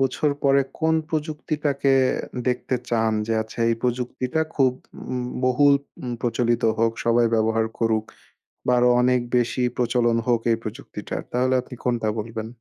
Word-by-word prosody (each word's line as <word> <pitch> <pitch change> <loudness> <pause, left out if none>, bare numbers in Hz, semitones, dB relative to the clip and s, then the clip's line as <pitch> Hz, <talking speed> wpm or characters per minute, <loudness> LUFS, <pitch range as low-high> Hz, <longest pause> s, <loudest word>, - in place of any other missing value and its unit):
বছর 135 +3 +1
পরে 140 0 +5 0.2
কোন 160 0 +2
প্রযুক্তিটাকে 150 -3 -1 0.6
দেখতে 125 +1 -1
চান 115 -1 +1
যে, 115 - -1
আচ্ছা 110 +2 -14
এই 115 - +2
প্রযুক্তিটা 125 +4 -1
খুব 130 -3 +3
ব - - -47 0.6
বহুল 140 +3 +5 0.5
প্রচলিত 120 0 0 0.2
হোক, 115 0 +2
সবাই 120 0 +4
ব্যবহার 110 0 +2
করুক 110 -1 +1 0.6
বা 125 - +3
আরো 125 0 +4
অনেক 125 0 +3 0.2
বেশি 120 +1 +1
প্রচলন 120 -1 +2
হোক 120 -2 +2
এই - - +2
প্রযুক্তিটার। 110 - -6
তাহলে 130 +1 +2
আপনি 125 - -11
কোনটা 120 -3 0
বলবেন? 110 0 -4
125 Hz, 145 wpm, -23 LUFS, 115-135 Hz, 0.6 s, পরে